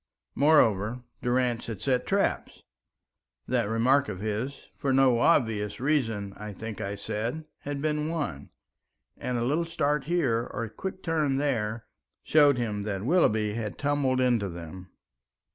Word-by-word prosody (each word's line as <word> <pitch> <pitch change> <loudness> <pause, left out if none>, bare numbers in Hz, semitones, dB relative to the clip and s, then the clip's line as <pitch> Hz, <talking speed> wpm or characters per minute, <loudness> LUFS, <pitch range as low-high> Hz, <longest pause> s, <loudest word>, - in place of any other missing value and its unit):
Moreover, 125 -6 +3 0.2
Durrance 125 -1 0
had 110 -4 -5
set 125 +2 0
traps, 200 0 0 0.8
that 120 -4 +1
remark 130 +5 +3
of 90 - -5
his 110 +6 -3
"for 140 - -1
no 130 -3 +4
obvious 110 -8 +2
reason, 115 -8 0
I 105 -1 -7
think 110 +1 -7
I 100 +1 -3
said," 115 +9 -3
had 145 0 -5
been 150 0 0
one, 145 - -3 0.7
and 125 - -3
a 120 - 0
little 150 +7 +1
start 150 -3 0
here, 135 -8 +1
or - - -3
a 115 - -6
quick 190 +5 -6
turn 155 -5 +1
there, 115 -6 -1 0.4
showed 145 -3 +5
him 105 -4 -2
that 100 -1 -3
Willoughby 110 - +3
had 110 -2 -4
tumbled 140 -3 +1
into 120 -6 +2
them. 85 +2 -9
125 Hz, 145 wpm, -28 LUFS, 105-145 Hz, 0.8 s, showed